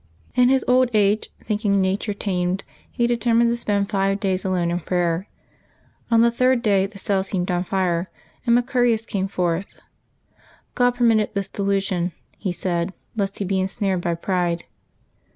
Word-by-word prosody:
In 250 0 +4
liis 265 -1 +3
old 255 0 +4
age, 205 +1 +2
thinking 205 -2 +1
nature 195 +2 0
tamed, 185 -1 -1 0.3
he 240 - 0
detemiined 235 0 +2
to 235 - +1
spend 205 -4 -1
five 195 0 +1
days 190 -3 -1
alone 180 -3 0
in 175 - 0
prayer. 175 +1 -1 0.8
On 230 -1 +5
the 235 0 +4
third 255 +1 +2
day 195 -2 +3
the 200 0 -13
cell 195 0 0
seemed 185 -2 -2
on 175 0 0
fire, 180 -2 0 0.3
and 235 -1 +4
Maearius 245 -2 +1
came 195 -3 -2
forth. 180 0 -2 0.9
God 245 0 +2
permitted 225 -4 +2
this 200 -1 -2
delusion, 195 -3 -1 0.3
he 190 - -2
said, 175 +1 -2 0.2
lest 200 -2 -2
he 200 - -2
be 190 0 0
ensnared 190 -1 -1
by 170 -1 -1
pride. 175 -1 -1
195 Hz, 160 wpm, -22 LUFS, 185-225 Hz, 0.9 s, On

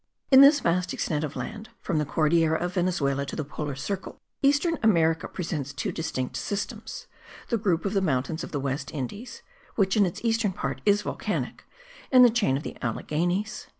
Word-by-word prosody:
In 265 0 +9
this 285 +1 +7
vast 175 +1 0
extent 150 -1 -1
of 150 -2 -4
land, 220 +1 -6
from 170 -5 -1
the 150 - -1
Cordillera 160 +1 +2
of 175 +1 -3
Venezuela 160 -7 0
to 140 - -6
the 155 - -2
polar 145 -1 -5
circle, 190 +9 -5 0.2
eastern 290 +4 +2
America 165 -6 +3
presents 150 -6 -4
two 130 - -3
distinct 130 -6 -3
systems, 200 0 -4 0.4
the 235 - +1
group 185 -5 0
of 195 - -1
the 195 - +2
mountains 155 0 -1
of - - -7
the 145 - -2
West 135 +1 -3
Indies 160 - -6 0.3
(which 190 -3 +2
in 205 -3 +4
its 170 - -5
eastern 225 -3 +1
part - - -4
is 205 0 +4
volcanic) - - -3 0.5
and 255 -1 +8
the 240 - +5
chain 205 - +1
of 145 - -6
the - - -7
Alleghenies. 175 - -2
175 Hz, 185 wpm, -26 LUFS, 150-210 Hz, 0.5 s, In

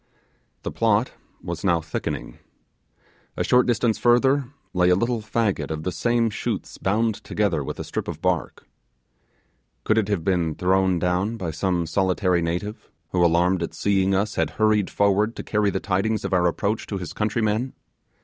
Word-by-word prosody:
The - - -3
plot 115 +1 +2 0.3
was 85 0 -5
now 85 -4 +3
thickening. 80 - -5 1.0
A - - +1
short 125 0 +4
distance 115 -2 +1
further 130 +2 +3 0.2
lay 90 0 +3
a 90 - +5
little 115 +3 0
faggot 105 -8 -1
of 80 -1 -4
the 90 - -1
same 115 +6 +1
shoots - - -4
bound 110 +2 0
together 100 -9 0
with - - -6
a - - -3
strip - - -4
of - - -5
bark. - - -1 1.2
Could 110 0 +3
it 105 - -1
have 100 -6 -1
been 85 -4 0
thrown 95 +1 +2
down 90 +6 0
by 90 -6 -3
some 85 +1 0
solitary 90 +1 +1
native, 90 +6 -4 0.2
who, 90 -1 +1
alarmed 85 +2 +3
at 85 - -4
seeing 95 -1 +2
us, 105 +2 0
had - - 0
hurried 110 -2 +3
forward 100 +3 +2
to - - -6
carry 105 -1 +1
the 95 - -1
tidings 100 +2 -1
of 95 - -2
our 90 -1 +3
approach 100 +5 -1
to 100 - -3
his 90 -2 -6
countrymen? 110 +3 0
100 Hz, 170 wpm, -24 LUFS, 90-110 Hz, 1.2 s, a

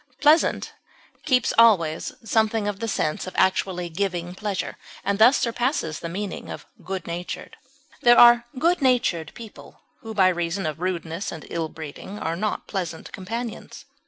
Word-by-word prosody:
Pleasant 305 +3 +3 0.5
keeps 255 -6 +2
always 175 -9 +4
something 220 -1 +1
of 205 -1 -3
the 230 - -3
sense 155 -5 -1
of 185 - -8
actually 185 -1 +1
giving 175 0 -3
pleasure, 200 0 -3 0.3
and 200 0 -1
thus 245 +5 +7
surpasses 235 - -1
the 170 - -5
meaning 195 +3 -5
of - - -7 0.2
good 190 -2 -5
natured; 175 +1 -6 0.5
there 240 0 +6
are 240 0 +8
good 340 +5 +2
natured 235 - +1
people 225 -3 -12 0.2
who 225 -3 -8
by 190 -2 +5
reason 175 +1 -2
of 155 0 -3
rudeness 175 0 -3
and 160 - -8
ill 165 -2 -2
breeding 160 +6 -9
are 165 -4 -2
not 210 +4 -2
pleasant 175 -5 -5
companions. 225 +5 -6
195 Hz, 155 wpm, -24 LUFS, 170-230 Hz, 0.5 s, are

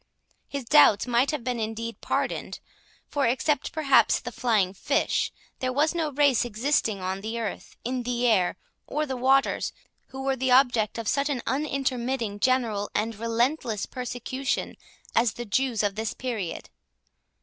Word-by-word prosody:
His 280 -1 -4
doubts 230 -6 +6
might 245 +2 +2
have 300 -5 -2
been 245 -1 -2
indeed 225 +1 -4
pardoned; - - -2 0.5
for, 285 -3 0
except 260 +3 0
perhaps 290 -4 +4
the - - -7
flying 215 -7 +1
fish, 280 - 0 0.3
there 255 0 -1
was 295 +5 +2
no 325 -3 -1
race 280 -3 +3
existing 225 -3 0
on 190 +1 -2
the 225 +3 -4
earth, 220 -3 -5
in 250 +1 -1
the 245 0 -1
air, 195 -7 +3 0.3
or 305 0 -1
the 265 -3 -3
waters, 270 +2 +2 0.3
who 265 0 -7
were 270 0 +1
the 260 0 -1
object 245 -5 +4
of 230 -2 -4
such 280 +5 +1
an 260 -5 -2
unintermitting, 260 -6 -1
general, 230 -5 +1
and 220 +2 0
relentless 230 -1 0
persecution 255 +2 -3 0.4
as 230 -1 +3
the 240 - -6
Jews 235 +1 0
of 205 -1 +1
this 220 +2 -3
period. 225 -9 -4
245 Hz, 155 wpm, -26 LUFS, 225-270 Hz, 0.5 s, doubts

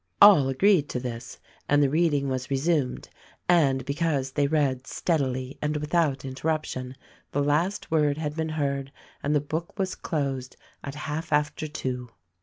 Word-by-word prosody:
All 185 -10 +8
agreed 155 +2 +3
to 125 - -2
this 120 -2 -6 0.3
and 145 0 +5
the - - +5
reading 145 -1 +2
was 130 -1 -3
resumed; 140 -1 0 0.4
and 140 -7 +3
be 140 - -1
cause 145 -4 0
they 145 +1 +1
read 140 -4 0
steadily 130 -5 -1
and 150 0 0
without 150 -2 0
interruption 130 -2 -3 0.4
the 145 - +1
last 160 +8 0
word 150 -2 +3
had 150 -1 -3
been 160 -1 -2
heard 140 -3 -2 0.3
and 145 +1 +1
the - - +5
book 160 +5 -4
was 190 -2 -1
closed 135 -5 -3 0.3
at 140 0 -6
half 150 +2 -4
after 150 +2 +1
two. 125 -4 -4
145 Hz, 160 wpm, -26 LUFS, 135-160 Hz, 0.4 s, All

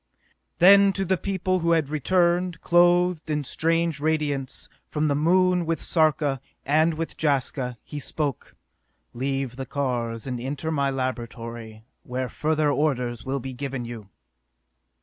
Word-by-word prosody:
Then 195 +3 +7
to 195 0 -1
the 190 - +2
people 185 0 -1
who 170 0 +2
had 160 -4 +1
returned, 175 +3 +1
clothed 175 -1 +3
in 150 -1 0
strange 165 +2 0
radiance, 145 -3 -1 0.2
from 155 0 0
the 140 - +1
Moon 180 +3 +3
with 165 0 -1
Sarka 150 -5 +1 0.2
and 155 +3 +3
with 165 +1 -5
Jaska 135 -4 0
he 150 - -7
spoke: 145 -1 -4 0.6
"Leave 135 0 -2
the 135 -1 -5
cars 120 -5 -2
and 125 -3 -4
enter 145 +5 -3
my 140 -3 +1
laboratory, 115 -4 -5 0.2
where 125 0 -4
further 155 +3 +1
orders 125 -6 -1
will 135 +1 -1
be 130 +1 -6
given 135 -1 -4
you!" 115 -4 -8
145 Hz, 140 wpm, -25 LUFS, 130-165 Hz, 0.6 s, Then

